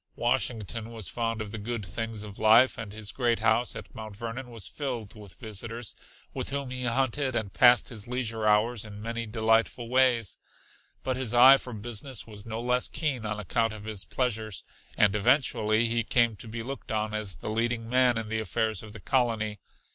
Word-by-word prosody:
Washington 115 -3 -1
was 110 -6 -5
fond 115 -1 -2
of 105 -1 -5
the 110 - -5
good 110 0 -3
things 110 +3 -4
of 105 -1 -9
life, 115 +4 +6
and 115 -4 -7
his 105 -1 -4
great 120 -3 +1
house 115 +2 +2
at - - -9
Mount 110 -2 -8
Vernon 120 +3 -5
was 115 -4 -4
filled 125 -8 -4
with 105 -4 -11
visitors, 115 +1 -5 0.4
with - - -3
whom 140 -2 -3
he 125 -1 -3
hunted 130 +2 0
and 105 -4 -2
passed 120 0 +6
his 110 -3 -5
leisure 115 -3 -1
hours 105 +2 +3
in 105 -1 -9
many 115 +1 -4
delightful 115 +2 +1
ways. 125 -5 +3 0.6
But 130 -1 -1
his 120 -3 -1
eye 130 +3 +9
for 125 - -8
business 115 +3 -4
was 105 -1 -11
no 110 0 -4
less 125 +1 +1
keen 135 -8 -2
on 105 0 -3
account 115 +3 0
of 105 -1 -9
his 105 -3 -4
pleasures, 110 -6 -2 0.3
and 105 -1 +4
eventually 110 -1 +3
he 115 0 +1
came 115 0 +3
to 115 - -9
be 115 +1 -5
looked 135 0 -7
on 110 0 -1
as 105 -3 -2
the - - -5
leading 115 +1 -1
man 125 0 +3
in 115 -1 -3
the 110 +1 -1
affairs 110 -1 -1
of 105 -1 -11
the 110 - -9
colony. 110 -4 0
115 Hz, 195 wpm, -28 LUFS, 110-120 Hz, 0.6 s, eye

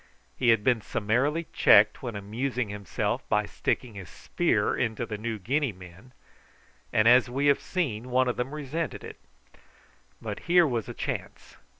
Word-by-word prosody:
He 120 - +1
had 115 -2 +4
been 120 -2 +2
summarily 130 +12 0
checked 105 +1 +5
when 120 -4 -5
amusing 115 +4 -3
himself 100 -2 -3
by - - +2
sticking 120 -3 -2
his 95 -5 -9
spear - - 0
into 115 -1 -2
the 110 -1 -5
New 110 +1 -4
Guinea 135 +7 -1
men, 90 +6 -14 0.8
and, 110 +1 +3
as 125 +1 +6
we 135 +3 -1
have 140 -1 +3
seen, 125 - -3
one 130 +1 +2
of 125 - 0
them 125 +2 -3
resented 150 +1 -4
it; - - -10 1.0
but - - -6
here 175 0 +6
was 120 -7 -2
a - - -7
chance. - - -6
120 Hz, 165 wpm, -27 LUFS, 105-135 Hz, 1.0 s, as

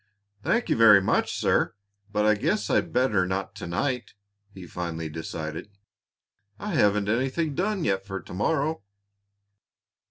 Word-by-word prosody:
"Thank 235 - +1
you - - +3
very 110 -3 +8
much, 95 - +1
sir, - - +1 0.4
but 105 0 +1
I 105 - +5
guess 105 0 -1
I'd 85 - +1
better 105 -5 +2
not 95 +1 -3
to - - -6
night," 125 +6 -2 0.4
he 95 -2 -10
finally 85 -2 -5
decided. 80 +2 -6 0.9
"I 210 -1 -5
haven't 105 -7 +3
anything 135 +8 0
done 195 +3 -1
yet 95 -1 0
for 95 -1 -5
to - - -12
morrow." 150 - 0
105 Hz, 145 wpm, -26 LUFS, 95-130 Hz, 0.9 s, very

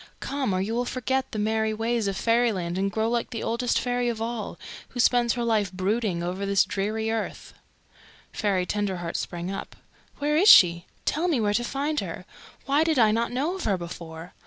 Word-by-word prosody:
Come, 270 -5 -2
or 185 - 0
you 200 +4 -2
will 245 +1 0
forget 260 +2 -2
the - - -5
merry 220 +1 0
ways 225 -1 0
of 195 - -2
Fairyland 225 -7 +1
and 195 +1 0
grow 220 +1 0
like 235 0 -1
the 230 - -5
Oldest 235 +1 0
Fairy 245 -1 0
of 230 -2 -3
All, 225 -1 -4 0.3
who 245 - -8
spends 240 -1 +3
her 240 - -2
life 215 -4 +1
brooding 190 -1 -1
over 180 +3 -3
this 200 0 +3
dreary 220 +3 -2
earth." 225 -1 -4 0.8
Fairy 195 -4 0
Tenderheart 185 -4 -2
sprang 175 +2 -4
up. 195 - -6 0.4
"Where 295 +1 0
is 385 +7 +6
she? 170 -1 +7 0.2
Tell 320 +4 0
me 310 -8 +1
where 205 -2 +1
to 240 - +1
find 285 +4 -1
her. - - -6 0.4
Why 285 +2 +3
did 320 -3 +1
I 220 -3 +5
not 230 +2 0
know 280 +8 -1
of 380 - -5
her 200 -3 +1
before? 170 -1 -8
220 Hz, 200 wpm, -26 LUFS, 195-245 Hz, 0.8 s, she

